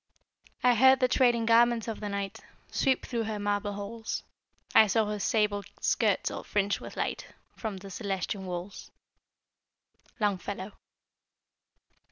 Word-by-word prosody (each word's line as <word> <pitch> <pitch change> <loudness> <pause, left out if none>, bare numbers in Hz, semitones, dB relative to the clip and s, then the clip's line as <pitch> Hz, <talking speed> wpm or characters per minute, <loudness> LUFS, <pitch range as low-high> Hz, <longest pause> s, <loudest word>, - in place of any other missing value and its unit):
I 250 0 +6
heard 260 +3 +6
the 255 - +4
trailing 240 -3 +3
garments 230 0 +4
of 225 - -4
the 210 - -4
night 200 -1 -4 0.3
Sweep 265 -2 +1
through 235 -3 -2
her 215 -1 -3
marble 205 0 -1
halls, 210 +3 -5 0.5
I 220 - +8
saw 220 +2 +2
her 210 0 -3
sable 210 -1 +1 0.2
skirts - - +1
all - - -6
fringed 205 -1 0
with - - -10
light - - -2 0.3
From 215 -4 -4
the 195 +1 -10
celestial 195 -1 -3
walls. 185 +1 -6 1.3
Longfellow. 200 -1 -2
210 Hz, 135 wpm, -29 LUFS, 200-230 Hz, 1.3 s, I